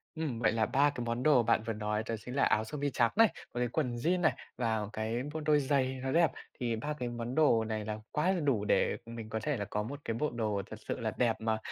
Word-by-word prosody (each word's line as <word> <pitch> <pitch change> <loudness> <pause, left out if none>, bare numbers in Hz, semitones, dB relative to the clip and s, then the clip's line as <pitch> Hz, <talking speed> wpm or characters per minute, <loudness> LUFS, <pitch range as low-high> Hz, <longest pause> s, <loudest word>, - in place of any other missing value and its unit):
Ừm, 145 -8 -2
vậy 110 -2 +3
là 110 -1 +2
3 145 +5 +3
cái 125 -4 -4
món 115 +1 -2
đồ 135 -5 +5
bạn 110 -1 +2
vừa 115 - 0
nói 105 0 -1
đó 115 - 0
chính 125 - -5
là 140 - +3
áo 110 - +3
sơ 150 +7 -6
mi 145 0 0
trắng 120 -2 +3
này, 225 0 +7 0.3
với 120 0 0
quần 125 -1 -1
jeans 175 +9 +1
này 160 - +4 0.2
và 110 -3 0
cái 110 +3 -2
một 160 - -2
đôi 150 -1 +5
giày 130 -2 +1
nó 130 - -1
đẹp. 165 -4 +4 0.3
Thì 120 -2 0
3 150 +7 -3
cái 120 -1 -2
món 120 +1 -4
đồ 145 -8 +4
này 110 -1 -3
là 105 0 -3
quá 155 +5 +2
là 185 - 0
đủ 125 -9 +1
để - - +2
mình 115 -1 -7
có 110 0 -2
thể 150 -3 0
là 105 - -3
có 105 +1 -2
một 140 +6 -6
cái 115 - -1
bộ 150 +5 0
đồ 105 -4 -1
thật 110 - -7
sự - - -2
là 110 -2 -1
đẹp 120 -3 +3
mà 110 0 +1
120 Hz, 275 wpm, -32 LUFS, 110-145 Hz, 0.3 s, này